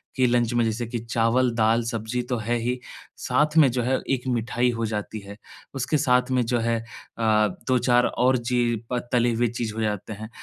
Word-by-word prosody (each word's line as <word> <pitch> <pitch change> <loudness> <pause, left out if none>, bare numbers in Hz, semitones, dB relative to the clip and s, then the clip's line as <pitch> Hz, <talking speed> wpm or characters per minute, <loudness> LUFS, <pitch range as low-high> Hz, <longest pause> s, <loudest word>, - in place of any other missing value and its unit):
कि 130 - +3
लंच 120 -1 +1
में 120 - +2
जैसे 115 +2 -2
कि 120 -1 -4
चावल, 115 +2 +1
दाल, 115 +1 +2
सब्जी 115 +1 -3
तो 125 - 0
है 115 +2 -1
ही, 125 +2 -2 0.4
साथ 150 +4 +1
में 150 -4 +7
जो 125 0 -1
है 130 +2 +1
एक 130 -1 -1
मिठाई 120 0 0
हो 115 -1 -2
जाती 110 0 -4
है। 100 +1 -11 0.4
उसके 135 +4 0
साथ 125 -3 +2
में 125 - +2
जो 120 +1 0
है 115 0 0 0.4
अ, 110 -1 +3 0.2
2-4 125 -1 +3
और 130 +1 +2
ची 120 -1 0 0.2
प 125 - +1
तली 120 -1 +3
हुई 120 +1 +1
चीज 115 -2 -4
हो 110 - -3
जाते 105 0 -2
हैं। 110 +1 -8
120 Hz, 205 wpm, -24 LUFS, 115-125 Hz, 0.4 s, में